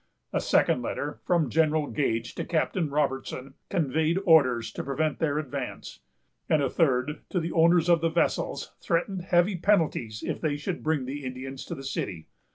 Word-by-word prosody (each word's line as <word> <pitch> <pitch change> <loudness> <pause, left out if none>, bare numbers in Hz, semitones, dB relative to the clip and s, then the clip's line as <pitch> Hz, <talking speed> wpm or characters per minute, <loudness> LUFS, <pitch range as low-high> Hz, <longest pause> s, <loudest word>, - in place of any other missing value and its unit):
A - - +1
second 125 - +3
letter, 145 +4 -4
from 165 -8 +2
General 155 -1 +2
Gage 115 -6 -1
to - - -4
Captain 165 0 0
Robertson, 135 -2 -2 0.2
conveyed 160 +1 +1
orders 130 -9 +4
to - - -5
prevent 150 +3 -1
their 150 -2 +1
advance; 145 -4 -5 0.5
and 155 - +4
a 140 -3 0
third, 145 -2 +1
to 180 - 0
the 165 0 -3
owners 170 +1 +4
of 170 -2 +4
the 165 - +2
vessels, - - -1
threatened 180 +3 0
heavy 175 +2 +2
penalties 160 - +1
if - - -3
they 150 -3 0
should 170 +5 -4
bring 155 -4 0
the 140 +2 -5
Indians 130 +1 -6
to 170 - -5
the 135 - -9
city. 90 -10 -4
150 Hz, 170 wpm, -27 LUFS, 135-165 Hz, 0.5 s, orders